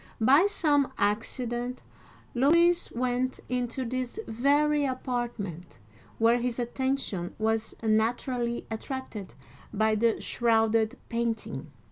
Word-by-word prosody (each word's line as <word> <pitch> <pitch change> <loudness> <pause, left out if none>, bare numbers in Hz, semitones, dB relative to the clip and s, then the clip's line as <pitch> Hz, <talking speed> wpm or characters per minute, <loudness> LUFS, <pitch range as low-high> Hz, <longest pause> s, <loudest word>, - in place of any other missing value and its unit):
By 275 - +6
some 290 -8 +2
accident 240 +4 -1 0.5
Louis 335 +7 +4
went 250 +1 -1
into 250 +1 -2
this 255 - -3
very 290 +5 +2
apartment, 240 - -3 0.4
where 230 +2 +4
his 240 -1 -2
attention 245 -7 -2
was 220 0 -1
naturally 235 +2 0
attracted 220 -4 -6 0.4
by 220 +1 +2
the 225 +1 +2
shrouded 225 -1 +2
painting. 225 - -3
240 Hz, 95 wpm, -28 LUFS, 220-260 Hz, 0.5 s, By